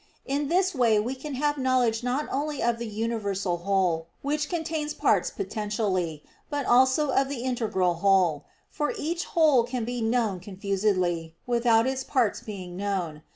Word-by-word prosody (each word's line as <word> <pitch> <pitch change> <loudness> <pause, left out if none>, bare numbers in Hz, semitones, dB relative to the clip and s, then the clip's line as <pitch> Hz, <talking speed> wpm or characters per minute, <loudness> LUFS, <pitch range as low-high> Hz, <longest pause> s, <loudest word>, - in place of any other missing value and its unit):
In 285 +1 -1
this 370 +4 +2
way 235 -6 +3
we 235 +5 -2
can 270 +2 -6
have 290 +2 0
knowledge 250 -3 +2
not 255 +4 -1
only 290 +1 -2
of 235 0 +1
the 235 - -4
universal 205 -4 -2
whole, 175 -3 0 0.2
which 295 +1 -1
contains 320 -3 -2
parts - - +2
potentially, 205 - -2 0.3
but 290 -2 -2
also 260 +4 +4
of 270 +1 +2
the 260 -4 -4
integral 220 -8 0
whole; 175 -4 +2 0.3
for 295 - -1
each 340 +3 -2
whole 300 -7 +6
can 240 -1 -3
be 245 0 -3
known 225 -4 +1
confusedly, 185 -4 -1
without 235 -2 +3
its 265 0 -1
parts 250 -6 +1
being 185 -4 -7
known. 185 -6 -3
235 Hz, 155 wpm, -26 LUFS, 195-270 Hz, 0.3 s, whole